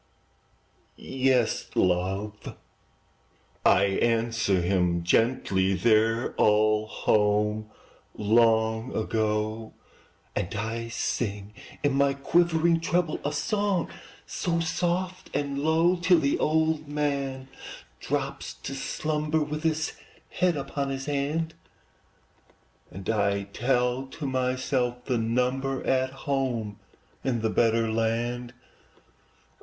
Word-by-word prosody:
"Yes, 130 -3 0
love!" 95 +4 -1 1.1
I 100 - +5
answer 115 0 +1
him 90 -2 +1
gently, 95 -2 +2
"They're 115 +3 +2
all 110 0 +3
home 105 0 +1 0.5
long 110 +2 +2
ago;" 110 0 -1 0.6
And 95 - -2
I 115 +2 -3
sing, 105 -3 -3 0.3
in 145 -2 +2
my 140 0 +2
quivering 165 +3 +2
treble, 170 -1 0
A 145 - -1
song 200 +2 0 0.4
so 170 -2 -1
soft 175 +2 -2
and 140 -1 -1
low, 165 +4 +3
Till 175 +1 +4
the 140 -3 +1
old 160 0 +1
man 140 -3 -2 0.5
drops 60 - -3
to 60 - -7
slumber, 155 +3 -1
With 150 +1 -4
his 160 0 0 0.4
head 180 -4 +1
upon 140 0 -3
his 135 0 -4
hand, 150 +3 -1 1.4
And 95 0 -9
I 100 -2 +1
tell 125 +5 0
to 140 +3 -7
myself 130 -1 -1
the 125 -4 0
number 125 +4 0
At 130 0 +2 0.2
home 125 -7 -1 0.4
in 120 -4 0
the 110 - +1
better 115 0 +2
land. 120 +2 -1
125 Hz, 100 wpm, -27 LUFS, 110-145 Hz, 1.4 s, I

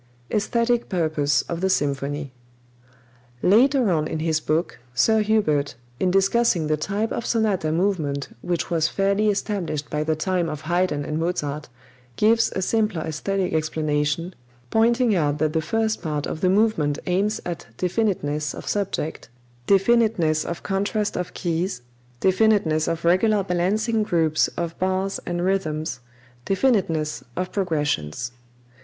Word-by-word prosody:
Esthetic 235 +3 +1
Purpose 155 -5 +1
of 170 0 -5
the 190 - +1
Symphony. 145 -3 -1 1.1
Later 245 +2 +4
on 155 -2 +1
in - - -3
his 160 0 0
book, 155 +3 -1 0.2
Sir 220 - +4
Hubert, 180 -10 +1 0.2
in 185 - +2
discussing 195 -2 +2
the 155 0 +1
type 200 +8 -2
of 235 - -2
sonata 210 -10 +1
movement 160 -6 -1
which 175 -1 -2
was 160 -2 +2
fairly 200 +4 +1
established 195 -8 -2
by 150 0 0
the 160 0 0
time 175 +1 0
of 150 - -5
Haydn 170 -3 0
and 155 +2 -2
Mozart, 150 -4 -2 0.5
gives 225 - +3
a 190 - 0
simpler 215 -5 0
esthetic 185 +4 -2
explanation, 155 +2 -1 0.4
pointing 235 +1 +3
out 150 -5 +1
that 155 0 0
the 160 - +1
first 220 +7 -1
part 150 -4 -2
of 160 - -5
the 185 - +3
movement 185 -8 +2
aims 200 +4 0
at 175 -1 -5
definiteness 175 -7 -1
of - - -9
subject, 195 - -2 0.4
definiteness 195 -6 +3
of 170 - -5
contrast 205 +2 -1
of 180 -1 -4
keys, 170 -5 -2 0.4
definiteness 190 -5 +3
of 165 0 -2
regular 200 +4 +3
balancing 205 +5 0
groups 165 -6 +2
of 170 -1 -3
bars 190 +1 0
and 175 0 -1
rhythms, 160 -7 -1 0.5
definiteness 185 - +1
of 185 0 -3
progressions. 145 - -1
180 Hz, 135 wpm, -23 LUFS, 155-205 Hz, 1.1 s, Later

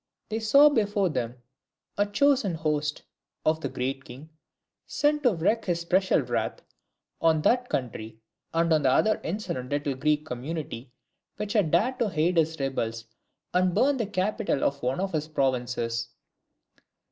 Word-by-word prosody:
They 220 +1 -2
saw 280 +7 +6
before 205 -7 +1
them 125 -5 -3 0.6
a 205 +1 +1
chosen 255 - +2
host 150 -2 -1 0.4
of 155 +1 +2
the 140 - -2
Great 135 +2 -3
King 135 +6 -11 0.6
sent 295 0 +1
to 245 -8 +3
wreak 200 +8 +1
his 175 -2 0
special 185 0 +2
wrath 120 -3 -2 0.6
on 160 -2 +3
that 250 +5 +2
country, 110 -3 -4 0.3
and 165 0 +2
on 155 - +3
the 135 - +3
other 215 +11 +3
insolent 160 -9 -4
little 145 -1 -1
Greek 150 +3 0
community, 130 -2 -5 0.5
which 210 -1 -3
had 205 -8 +2
dared 240 - +1
to 225 -5 +1
aid 170 +3 +2
his 160 -1 +1
rebels 115 -4 -2 0.5
and 180 0 +2
burn 280 +1 +3
the 225 -5 -1
capital 195 -5 -1
of 140 0 0
one 125 +4 -1
of 195 0 -1
his 155 -1 -2
provinces. 120 -5 -1
160 Hz, 155 wpm, -27 LUFS, 135-205 Hz, 0.6 s, saw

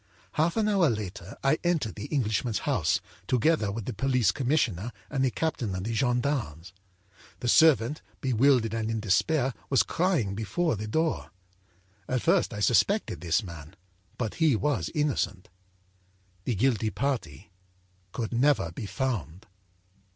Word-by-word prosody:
âHalf 165 +5 +1
an 215 -1 +2
hour 195 -7 +3
later 105 -2 -5
I 135 +3 +3
entered 165 -10 0
the 105 - -7
Englishman's 115 -4 0
house, - - +1 0.3
together 125 -4 +2
with 110 0 -5
the 125 - -3
police 125 -2 +2
commissioner 125 - 0 0.2
and 135 -3 0
the 130 - +3
captain 120 -9 -2
of 90 - -4
the 115 +3 -3
gendarmes. 120 - -1 0.7
The 125 - -3
servant, 150 0 +4 0.2
bewildered 125 -3 +3
and 110 -1 -2
in 115 -1 -1
despair, 125 +7 +1 0.2
was 135 - +4
crying 165 - 0
before 115 - -1
the 105 +1 -5
door. 160 +8 -1 0.8
At 130 -1 -1
first - - +3
I 105 - -5
suspected 195 - +2
this 90 +5 +1
man, 85 -2 -10 0.4
but 110 -4 -2
he 155 -6 +5
was 115 - 0
innocent. 110 -11 -1 1.0
âThe 120 -5 0
guilty 115 -1 +2
party 110 - -3 0.6
could 115 +3 -4
never 125 - +2
be 100 +5 -6
found. 105 - -3
120 Hz, 145 wpm, -28 LUFS, 105-140 Hz, 1.0 s, he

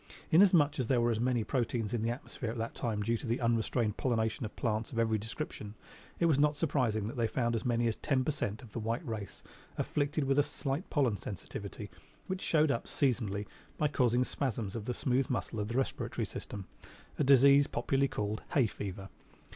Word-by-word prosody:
Inasmuch 165 -5 +5
as 125 - 0
there 130 -1 +3
were 120 0 +3
many 120 -2 +1
proteins 120 -3 -1
in 120 - 0
the 115 - 0
atmosphere 120 -1 -5
at 115 - -4
that 115 0 -3
time 110 -3 -2
due 115 +2 +1
to 120 - -7
the 115 +2 0
unrestrained 115 -2 +1
pollination 115 -2 0
of - - -15
plants 110 -1 -1
of 115 - -6
every 110 -1 +2
description, 110 -2 -6 0.4
it 170 - +3
was 155 -4 +4
not 150 0 +4
surprising 125 -8 0
that 115 - -5
they 115 -1 +2
found 120 +1 0
as 115 - -3
many 120 -1 +2
as 115 - 0
ten 135 -3 +1
per - - +2
cent 110 -7 -3
of 115 - -13
the 115 - -4
white 115 +7 -2
race 110 -4 -6 0.3
afflicted 145 +1 0
with 135 +1 +2
a - - +8
slight 145 +2 -3
pollen 130 -9 +2
sensitivity 95 -3 -7 0.3
which 190 0 -3
showed 155 -2 +3
up 115 - -1
seasonally 110 -7 0 0.3
by 150 - +2
causing 125 -4 +2
spasms 115 -7 -3
of 110 -3 -4
the 125 - -1
smooth 130 0 +1
muscle 115 -3 -2
of 105 - -1
the 115 +3 -2
respiratory 135 - -1
system, 100 -2 -7 0.5
a - - +3
disease 140 +1 +7
popularly 140 -1 +1
called 105 -3 -3
"hay 140 -7 +5
fever." 100 -2 -5
120 Hz, 205 wpm, -32 LUFS, 110-140 Hz, 0.5 s, a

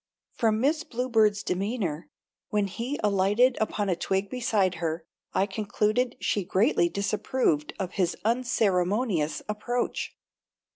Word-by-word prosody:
From 220 -2 +1
Miss 300 +6 +2
Bluebird's 225 -6 +1
demeanor, 185 -4 -2 0.4
when 210 -2 +1
he 235 +8 -4
alighted 210 +5 +3
upon 210 -1 0
a 185 - +2
twig 195 +3 -1
beside 210 -8 +1
her, 160 0 -2 0.3
I 195 - +3
concluded 215 +3 0
she 205 - 0
greatly 185 -2 +2
disapproved 200 - 0
of 190 -3 -3
his 180 -3 0
unceremonius 205 -6 +1
approach. 240 +4 -2
210 Hz, 115 wpm, -27 LUFS, 190-235 Hz, 0.4 s, alighted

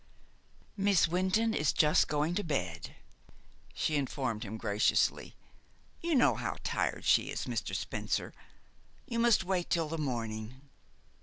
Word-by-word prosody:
"Miss 195 -3 +3
Wynton 185 +6 +1
is 150 -6 +2
just 150 0 +3
going 150 +3 0
to 205 - -1
bed," 90 - -3 0.8
she 155 - 0
informed 130 -5 -2
him 110 0 -6
graciously. 105 -1 +1 0.7
"You 335 -2 0
know 255 - +5
how - - -4
tired - - -1
she - - +4
is, - - -3
Mr. - - -3
Spencer. - - -3 0.7
You 235 -1 -3
must 230 -4 +4
wait 185 -2 -1
till 165 -3 0
the 165 +1 -4
morning." 115 -3 -4
155 Hz, 135 wpm, -31 LUFS, 120-190 Hz, 0.8 s, know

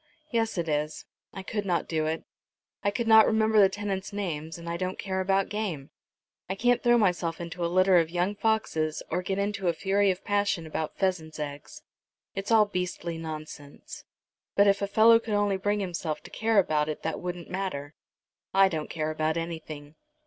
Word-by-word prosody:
"Yes, 225 -4 0
it 170 -1 -1
is. 150 0 -2 0.3
I 190 - -8
could 210 +2 -3
not 180 -3 -1
do 155 -1 0
it. 160 +1 -2 0.6
I 200 - +3
could 225 +3 -2
not 220 -1 +8
remember 220 0 +3
the 195 -2 +7
tenants' 195 -1 -4
names, 165 -6 -4
and 170 0 -10
I 170 - -2
don't 185 +2 -3
care 190 -1 -2
about 195 +1 +1
game. 185 -10 -4 0.6
I 190 - -1
can't 245 +4 +2
throw 240 -1 +4
myself 180 -6 +1
into 170 +1 -5
a 170 - +1
litter 185 0 +5
of 165 -2 +3
young 180 +3 0
foxes, 200 -8 0
or 180 +3 0
get 190 +1 -2
into 200 -1 -1
a 170 - +3
fury 195 +4 +2
of 185 0 -2
passion 205 -4 0
about 155 0 -4
pheasants' 180 -5 -1
eggs. 145 -1 -7 0.5
It's 195 +1 -4
all 220 -2 +6
beastly 180 -3 -4
nonsense, 155 -3 -8 0.5
but 200 - +6
if 200 0 +3
a 200 - 0
fellow 225 +3 +6
could 225 -2 -3
only 205 -1 +2
bring 205 +2 0
himself 170 -4 -3
to - - -12
care 225 -1 0
about 155 -5 +3
it 155 - -5
that 160 -1 -2
wouldn't 180 -1 -6
matter. 170 -7 -4 0.6
I 195 0 +6
don't 155 -4 -4
care 155 -1 -2
about 155 +1 -1
anything." 155 -3 -6
185 Hz, 190 wpm, -27 LUFS, 160-205 Hz, 0.6 s, not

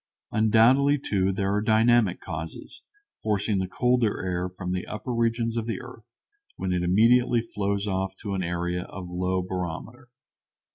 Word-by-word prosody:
Undoubtedly, 115 +6 +4
too, 95 -7 0
there 95 +1 -1
are 105 - +1
dynamic 110 -2 +3
causes, 80 -1 -7 0.4
forcing 105 -1 0
the 95 - -1
colder 125 +1 +1
air 90 0 -1
from 90 0 -6
the 90 0 -3
upper 110 +4 -4
regions 115 0 0
to 115 - -1
the 115 -3 -4
earth, 120 -1 -13 0.4
when 95 -1 -2
it 90 - 0
immediately 115 +7 +4
flows 100 -3 -2
off 95 -1 -2
toward 100 -3 -3
an 85 - -2
area 90 +1 -2
of 90 -2 -8
low 90 +1 -1
barometer. 90 -2 -5
100 Hz, 155 wpm, -26 LUFS, 90-115 Hz, 0.4 s, Undoubtedly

